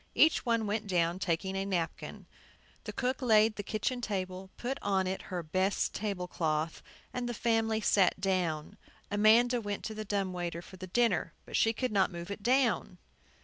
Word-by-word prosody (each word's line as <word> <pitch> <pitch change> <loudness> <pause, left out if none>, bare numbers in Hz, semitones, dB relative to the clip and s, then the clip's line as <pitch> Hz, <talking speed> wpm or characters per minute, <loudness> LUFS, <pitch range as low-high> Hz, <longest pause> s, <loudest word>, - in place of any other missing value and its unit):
Each 315 - +5
one 230 -2 +2
went 210 +1 -2
down, 175 -1 +1
taking 190 +2 -1
a 195 - 0
napkin. 180 -4 -3 0.6
The - - -4
cook 255 +1 -2
laid 220 -3 +4
the - - -3
kitchen 220 +5 -2
table, 190 -3 -3
put 255 +3 -3
on 195 -2 +1
it 190 +1 -2
her 180 -2 -3
best 185 +5 0
table 195 -4 -3
cloth, 160 -2 -1 0.3
and 245 -1 -2
the 240 - -3
family 225 -1 +1
sat 195 -3 +3
down. 180 -6 -1 0.3
Amanda 230 +4 +5
went 205 -2 -4
to 220 - -4
the 215 0 -5
dumb 195 -3 -1
waiter 175 -1 -4
for 190 - -12
the 185 0 -7
dinner, 190 -6 +1
but - - -6
she 225 - +4
could 255 +2 -2
not 200 -1 +2
move 170 +2 -7
it 200 - -5
down. 255 +4 +2
200 Hz, 185 wpm, -31 LUFS, 185-225 Hz, 0.6 s, Each